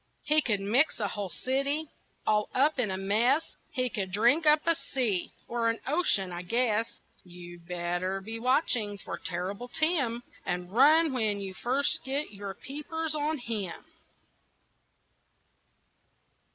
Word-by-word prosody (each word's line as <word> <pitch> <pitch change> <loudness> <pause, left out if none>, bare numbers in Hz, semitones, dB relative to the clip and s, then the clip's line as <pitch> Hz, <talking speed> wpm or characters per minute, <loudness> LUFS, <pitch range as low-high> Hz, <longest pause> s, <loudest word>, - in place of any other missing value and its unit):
He 305 +1 +4
could 210 -8 0
mix 235 +11 +2
a 205 -2 -1
whole 200 -1 -4
city 275 - -1 0.4
All 210 -1 +2
up 285 +2 +3
in 230 -5 +1
a 190 - -2
mess, 220 +10 +1
He 255 -5 -1
could 195 -5 -3
drink 240 - +3
up 300 0 +5
a 335 - +5
sea 240 - -1 0.2
Or 235 -1 0
an 230 - 0
ocean, 265 - +2
I 175 0 -5
guess. 225 +3 +1 0.4
You'd 175 -1 -12
better 180 +2 -2
be 225 +4 -6
watching 240 -5 +1
for - - -7
Terrible 185 +7 -3
Tim, 275 -5 +1 0.2
And 180 0 -3
run 300 +6 +5
when 215 -5 +1
you 195 -1 -5
first 260 +8 +1
get 275 +3 -2
your 200 -1 -6
peepers 310 - -4
on 305 +1 -1
him. 220 -8 -4
230 Hz, 140 wpm, -29 LUFS, 195-285 Hz, 0.4 s, up